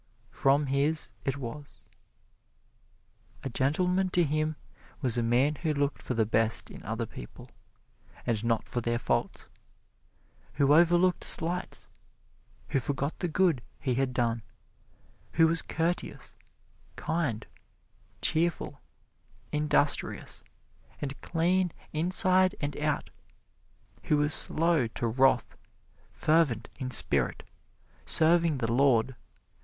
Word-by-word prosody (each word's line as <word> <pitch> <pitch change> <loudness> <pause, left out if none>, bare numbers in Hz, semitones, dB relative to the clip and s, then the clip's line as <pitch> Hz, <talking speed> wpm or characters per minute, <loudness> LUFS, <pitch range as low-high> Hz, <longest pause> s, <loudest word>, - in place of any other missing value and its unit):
From 140 +2 +2
his 140 +2 0 0.2
it 135 0 -1
was. 140 +2 -9 1.6
A 135 - -3
gentleman 180 +9 +1
to 180 -1 +2
him 155 +1 -1 0.4
was 125 -5 0
a 120 - +1
man 120 +6 +2
who 155 -3 -1
looked 140 0 -1
for 125 - -4
the 110 -1 +2
best 110 +1 +2
in - - -11
other - - -3
people, - - -12 0.8
and 115 -3 -1
not 115 -1 -1
for 120 - -3
their 120 0 -1
faults; - - -2 1.0
who 140 0 +3
overlooked 175 +2 +3
slights; 175 +2 0 0.8
who 135 - +1
forgot 140 +3 -3
the 180 - -1
good 170 -5 +1 0.2
he 130 -3 -1
had 135 +1 0
done; 120 -2 -1 0.9
who 165 -1 +5
was 165 0 +4
courteous, 170 +2 -4 0.6
kind, 150 -9 -2 0.8
cheerful, 165 +1 0 0.7
industrious 150 -1 -1 0.6
and 140 -1 -5
clean 180 +2 0 0.2
inside 185 +3 +2
and 145 0 -3
out; 150 -1 -2 0.9
who 150 - +2
was 145 +1 +3
slow 165 -6 +6
to 115 - -5
wrath, 125 +2 +2 0.6
fervent 155 -8 +1
in 130 -2 -4
spirit, 125 - +1 0.6
serving 165 -1 +3
the 115 -2 -1
Lord. 130 -1 +2
145 Hz, 115 wpm, -28 LUFS, 125-165 Hz, 1.6 s, slow